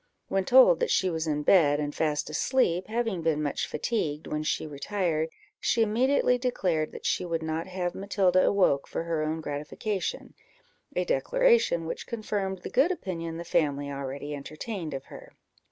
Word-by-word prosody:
When 195 -1 0
told 260 - +7
that - - 0
she 185 -1 +2
was 160 -1 -2
in 150 -1 -1
bed, 145 -5 +5
and 145 -1 -2
fast 150 -2 0
asleep, 180 - +1
having 225 -5 -1
been 155 -2 +1
much 145 - -1
fatigued 155 -10 -2
when 150 - -3
she 155 - -1
retired, 160 +2 -1 0.3
she 230 - +2
immediately 250 +3 +2
declared 180 -11 0
that - - -9
she - - +1
would 165 -2 -2
not 160 +2 -3
have 180 -1 -3
Matilda 190 -2 +2
awoke 180 -9 +3
for - - -3
her 165 -2 -1
own 155 +1 -2
gratification 155 +7 -4 0.6
a - - +1
declaration - - +2
which 160 - -5
confirmed 200 -4 -3
the - - -5
good 275 +8 +4
opinion 165 - -4
the 170 - -5
family 145 -3 0
already 140 +1 -5
entertained 155 +3 -5
of 135 - -6
her. - - -12
170 Hz, 170 wpm, -28 LUFS, 155-210 Hz, 0.6 s, told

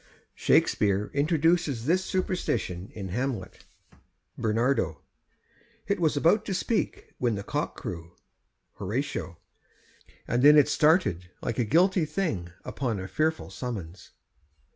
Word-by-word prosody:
' - - -43
Shakspeare 100 0 +3
introduces 150 -3 +1
this 180 +5 +2
superstition 120 - -2
in 100 -3 -5
Hamlet: 115 -2 -4 0.7
Ber. 115 - 0 0.9
It 200 -1 0
was 155 -4 +1
about 170 +9 +4
to 195 - -2
speak, 220 +4 -2
when 120 -3 +1
the 100 - -5
cock - - -3
crew. 85 -1 -7 0.6
Hor. 105 +5 -4 1.3
And 120 - +1
then 150 +2 +8
it 145 - +6
started 125 - +2
like 120 -1 -2
a - - +3
guilty 175 - +3
thing 110 - -2
Upon 120 -7 -2
a 95 - -5
fearful 160 +7 -1
summons. 100 -8 -6
125 Hz, 120 wpm, -27 LUFS, 100-160 Hz, 1.3 s, then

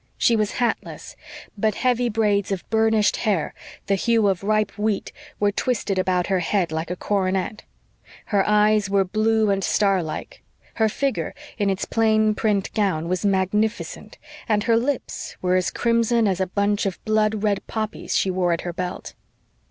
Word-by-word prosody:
She 235 - +3
was 215 -2 0
hatless, 240 -2 -3 0.4
but 215 0 0
heavy 245 -1 +1
braids 210 -3 +1
of 190 -2 -3
burnished 220 -1 +3
hair, 200 -8 0 0.3
the 200 - +1
hue 225 +2 +2
of 190 -2 -1
ripe 215 +1 +1
wheat, 210 -1 -1 0.3
were 205 0 +2
twisted 205 -3 -1
about 180 -1 +1
her 190 -2 +1
head 175 -1 0
like 160 +1 -3
a 180 - -2
coronet; 190 +1 -1 0.7
her 200 -1 +4
eyes 210 -1 +3
were 195 -1 +3
blue 215 +2 +2
and 195 0 0
star 195 -2 +2
like; 155 -2 -7 0.4
her 220 - +4
figure, 275 +7 -2 0.2
in 200 -1 +2
its 190 0 -1
plain 220 -1 +2
print 210 -2 0
gown, 180 -6 0
was 185 -1 -1
magnificent; 205 +3 -1 0.3
and 210 -1 +2
her 230 +2 +3
lips 255 +4 -2
were 180 0 +1
as 185 -1 +1
crimson 230 -1 +2
as 190 -2 0
the 190 - 0
bunch 200 +2 0
of 190 - -3
blood 215 -1 +1
red 205 -2 +1
poppies 220 -1 -3
she 190 - +1
wore 180 -1 +1
at 165 - -2
her 175 - -5
belt. 180 +1 -5
205 Hz, 170 wpm, -23 LUFS, 190-220 Hz, 0.7 s, her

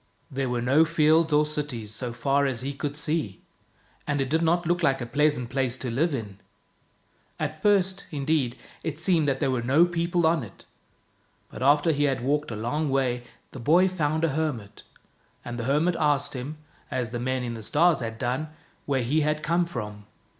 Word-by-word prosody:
There 135 -1 -2
weie 120 -1 -1
no 140 +6 +5
fields 160 0 +3
or 150 +1 +4
cities, 140 -8 -4
so 120 +2 -4
far 135 +4 +1
as 125 -3 -3
he 140 +2 -3
could 145 +1 -4
see, 150 - -2 0.7
and 145 -1 0
it 135 -1 -1
did 160 +1 +2
not 170 +1 +2
look 175 +2 +1
like 135 -4 +2
a 120 - -3
pleasant 140 -1 +1
place 130 -2 0
to 125 -2 -4
live 145 +5 +1
in. 105 -5 -7 1.0
At - - -3
first, 195 -2 +2
indeed, 140 -4 0 0.3
it 155 -3 -3
seemed 165 -2 +2
that 135 -1 0
there 130 - +1
were 125 -2 0
no 140 +8 +4
people 175 0 0
on 160 -1 +3
it, 105 -7 -11 0.9
but 110 - -9
after 145 +4 +4
he 145 -1 +1
had 135 -4 0
walked 145 +3 0
a 115 - -4
long 140 +8 -1
way 130 -2 +1 0.3
the 130 - -9
boy 170 +10 +4
found 160 -4 -1
a 165 - +3
hermit, 135 -9 -3 0.6
and 120 0 -5
the 115 - -3
hermit 150 +6 +2
asked 145 -2 +1
him 135 +4 -6 0.2
— - - -31
as 125 -3 -2
the 120 - -3
men 130 +1 -1
in 120 -1 -3
the 115 - -7
stars 160 +8 +3
had 115 -2 -5
done 130 +6 -2 0.2
— - - -35
where 135 -3 +1
he 150 +7 +1
had 150 +1 0
come 170 +2 +1
from. 105 -10 -7
140 Hz, 205 wpm, -26 LUFS, 125-160 Hz, 1.0 s, no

